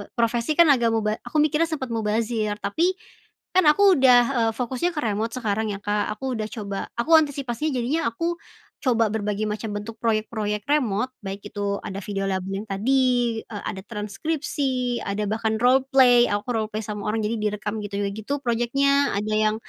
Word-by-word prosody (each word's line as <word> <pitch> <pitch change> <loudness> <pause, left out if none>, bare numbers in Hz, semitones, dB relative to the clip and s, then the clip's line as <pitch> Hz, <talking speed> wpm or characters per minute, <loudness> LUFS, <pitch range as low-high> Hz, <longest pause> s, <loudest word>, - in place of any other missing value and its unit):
profesi 235 +5 0
kan 340 - +8
agak 235 -4 +3
muba 215 -1 0
aku 305 - 0
mikirnya 305 +1 +2
sempet 295 -5 -4
mubazir 220 -1 -1
tapi, 335 - 0 0.6
kan 370 - +5
aku 390 +3 +5
udah, 250 -2 +7 0.3
eee, - - -1
fokusnya 255 +8 -1
ke - - -1
remote 220 +1 -1
sekarang 220 -3 -1
ya - - -8
Kak 205 0 0
aku 260 +3 -3
udah 215 - -2
coba 200 -3 -5 0.2
aku 325 +8 +2
antisipasinya 285 -1 -2
jadinya 265 +7 0
aku, 335 +8 -2 0.5
coba 230 -5 +2
berbagai 210 -1 -2
macam 210 0 -4
bentuk 215 +2 -6
proyek-proyek 215 -2 -1
remote 255 -4 +1
baik 195 +1 -5
itu 200 -1 -2
ada 195 -1 -5
video 195 -1 -3
lagu 190 -1 -2
yang 195 +2 -3
tadi, 245 +2 +1
eee, 205 -2 -8
ada 190 -2 -4
transkripsi, 250 +3 -2
ada 200 +1 -2
bahkan 220 0 0
roleplay, 255 -1 +5
aku 205 +2 -2
roleplay 215 0 -2
sama 210 -1 -5
orang 220 +1 -1
jadi 220 +2 -1
direkam 210 0 -2
gitu 205 -1 -5 0.2
gitu 220 +7 -4
proyeknya 275 +4 +2
ada 210 +1 -2
yang, 215 0 +2
225 Hz, 170 wpm, -24 LUFS, 210-260 Hz, 0.6 s, kan